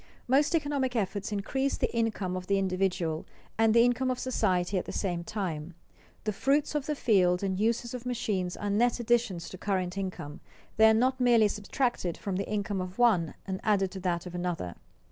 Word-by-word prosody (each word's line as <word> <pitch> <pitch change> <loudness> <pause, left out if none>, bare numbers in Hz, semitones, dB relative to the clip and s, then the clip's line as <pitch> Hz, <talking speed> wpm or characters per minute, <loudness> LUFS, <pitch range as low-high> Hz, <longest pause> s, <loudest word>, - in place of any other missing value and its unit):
_ - - -27 0.2
Most 285 +6 +3
economic 285 -5 0
efforts 200 -1 -2
increase 265 +7 -1
the - - -1
income 215 -5 0
of 180 0 -5
the 200 - +2
individual 185 -4 0 0.3
and 225 0 +4
the 230 +1 +6
income 245 +2 +2
of 255 - 0
society 190 -7 0
at - - -6
the - - -6
same 175 -4 -2
time. 175 -5 -4 0.5
The 215 - -1
fruits 280 +9 +1
of 295 -2 -2
the 300 - 0
field 185 -8 +3
and 190 -1 0
the 190 - -3
uses 230 +1 0
of 250 -2 -5
machines 215 -8 -2
are 205 -1 -2
net 235 +4 +2
additions 235 -7 +1
to 185 - -10
current 190 -2 -1
income; 175 -5 -5 0.4
they 220 0 +7
are 220 - +5
not 255 +3 +2
merely 235 -3 +5
subtracted 210 -3 -2
from 195 -2 -3
the 195 - -3
income 205 -2 -1
of 185 +1 -6
one 210 -10 +3
and 190 -1 -3
added 195 -3 +2
to 190 - -6
that 175 -2 -1
of 180 - -8
another. 175 - -3
205 Hz, 200 wpm, -29 LUFS, 185-240 Hz, 0.5 s, they